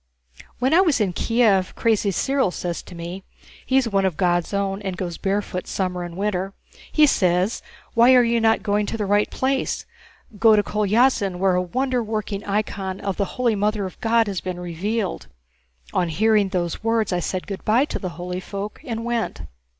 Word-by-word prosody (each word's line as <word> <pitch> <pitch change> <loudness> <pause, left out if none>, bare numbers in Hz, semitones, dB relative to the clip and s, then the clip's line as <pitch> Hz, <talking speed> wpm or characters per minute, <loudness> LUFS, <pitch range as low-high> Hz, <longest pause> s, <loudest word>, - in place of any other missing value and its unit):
When 260 +4 +1
I 355 - +7
was 325 -9 +2
in 195 -4 +1
Kiev, 215 -4 +2
Crazy 220 -3 +2
Cyril 265 +4 +1
says 175 -1 -4
to 180 - -12
me 170 +3 -7 0.4
(he's 265 -2 +3
one 195 -3 +1
of 185 -5 0
God's 175 -2 +1
own 200 0 -1
and 190 -3 -4
goes 175 -3 -4
barefoot 195 -2 -2
summer 180 -2 -2
and 175 0 -7
winter), 195 -1 -1 0.4
he 305 - +6
says, 185 -4 +1 0.3
'Why 240 +3 +6
are 250 - +6
you 235 0 +1
not 225 -2 +3
going 205 -1 +1
to - - -3
the 210 - -1
right 205 +1 +2
place? 265 0 -1 0.5
Go 225 -1 +6
to 205 - +3
Kolyázin 210 -1 +2
where 190 +1 +2
a 180 - +2
wonder 255 +7 -1
working 215 -2 -3
icon 200 -2 -2
of 195 -2 -3
the 200 - +1
Holy 245 -2 +2
Mother 210 0 0
of 185 - -9
God 230 0 +3
has 195 -4 -3
been 185 -1 -5
revealed.' 185 +4 -3 0.7
On 175 - +1
hearing 210 +3 +3
those 175 0 -2
words 225 -3 +1
I 180 - +1
said 185 +2 -3
good 195 -2 -6
by 235 +6 +3
to - - -4
the 185 - -4
holy 180 +1 -4
folk 200 +2 -6
and 230 -5 -4
went." 235 - -2
205 Hz, 190 wpm, -22 LUFS, 185-225 Hz, 0.7 s, I